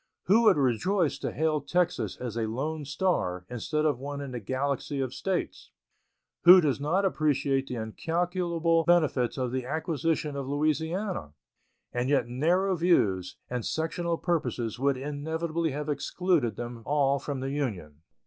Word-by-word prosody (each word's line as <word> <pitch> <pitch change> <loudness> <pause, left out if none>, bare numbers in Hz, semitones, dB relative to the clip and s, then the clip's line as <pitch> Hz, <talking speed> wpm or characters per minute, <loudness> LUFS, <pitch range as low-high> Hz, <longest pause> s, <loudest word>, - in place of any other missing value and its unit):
Who 225 +5 +4
would 215 - +6
rejoice 145 - +1
to - - -3
hail 155 -1 0
Texas 180 0 0
as 120 -3 -5
a 115 -1 -1
lone 145 +7 -3
star 135 - -1
instead 150 +6 -1
of 145 -5 +1
one 140 +1 -5
in 140 -2 -6
the 125 - -4
galaxy 135 +5 -2
of 130 -2 -2
States? 190 -2 -3 0.7
Who 180 +2 +10
does 145 -5 0
not 180 +7 +1
appreciate 140 -5 +1
the 125 - -4
incalculable 165 - 0
benefits 150 -9 +2
of 125 -2 -1
the 130 0 -2
acquisition 155 +1 -1
of 140 -2 -4
Louisiana? 155 - -1 0.6
And 125 +1 -1
yet 135 -5 +2
narrow 175 +10 +1
views 105 - +2
and 125 -2 -3
sectional 165 +3 -1
purposes 135 - -2
would 140 0 +2
inevitably 160 +4 -2
have 145 +1 -4
excluded 150 - 0
them 120 +1 -6
all 140 0 +2
from 140 0 -4
the 135 +1 -3
Union. 95 - -4
145 Hz, 150 wpm, -28 LUFS, 125-165 Hz, 0.7 s, Who